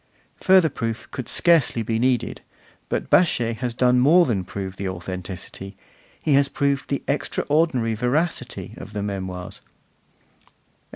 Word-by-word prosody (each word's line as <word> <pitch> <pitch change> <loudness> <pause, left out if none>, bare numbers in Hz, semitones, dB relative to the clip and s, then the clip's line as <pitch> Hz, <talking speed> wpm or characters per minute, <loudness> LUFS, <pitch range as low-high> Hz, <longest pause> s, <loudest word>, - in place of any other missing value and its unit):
Further 185 -3 +5
proof 115 -4 -4
could 130 - -6
scarcely 165 -9 +3
be 110 +1 -1
needed, 125 -1 0 0.5
but - - -3
Baschet 120 -10 +3
has 120 -1 -3
done 125 0 +3
more 165 +7 +6
than 105 -8 -1
prove 95 0 -6
the 95 -1 -3
authenticity, 95 +2 -7 0.5
he 150 - +2
has 140 0 +4
proved 140 -1 -1
the 140 - -2
extraordinary 145 -4 0
veracity, 130 +10 -2
of 105 - -10
the 105 -1 -3
Memoirs. 95 0 -5
120 Hz, 130 wpm, -23 LUFS, 100-140 Hz, 0.5 s, more